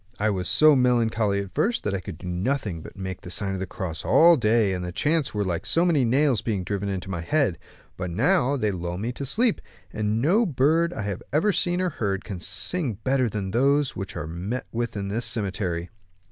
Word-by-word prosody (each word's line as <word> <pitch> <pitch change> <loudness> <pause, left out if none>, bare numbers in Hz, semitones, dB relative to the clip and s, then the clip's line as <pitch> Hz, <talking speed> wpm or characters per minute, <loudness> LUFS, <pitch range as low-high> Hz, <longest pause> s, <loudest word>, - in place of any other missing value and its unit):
I 110 +1 +1
was 95 -2 -2
so 155 -1 +6
melancholy 115 -5 +2
at 95 -2 -9
first 230 - 0
that 105 - -1
I 100 - -1
could 85 -3 -8
do 90 - -11
nothing 95 - -2
but - - -12
make 95 -2 -5
the 90 - -9
sign 95 +2 -2
of 95 - -3
the 95 - -3
cross 85 -3 -5
all 170 +1 +6
day, 110 -5 +2
and 90 -1 -3
the 90 - -4
chants 150 - 0
were 105 - +1
like 90 -3 -2
so 170 +2 +2
many 155 -7 +3
nails 130 -1 +2
being 110 -5 -2
driven 100 +2 -3
into 95 -1 -4
my 85 -3 -3
head; 120 - +1 0.4
but 90 - -3
now, 145 - +2
they 110 -5 0
lull 90 -1 -4
me 110 +5 -2
to 135 +2 -5
sleep, 225 - +1 0.3
and 105 +1 0
no 180 - +3
bird 165 - +2
I 110 - -4
have 100 -2 -4
ever 160 +9 +3
seen 175 +1 +1
or 185 -1 0
heard 100 -7 -2
can 100 -4 -6
sing 155 - -1
better 130 -2 +2
than 100 -2 -4
those 140 +4 +2
which 95 - -6
are 75 - -4
to 80 - -7
be 85 - -6
met 120 +7 -3
with 120 -2 -3
in 100 -1 -3
this 115 +4 -1
cemetery." 95 -5 -2
110 Hz, 230 wpm, -25 LUFS, 95-140 Hz, 0.4 s, so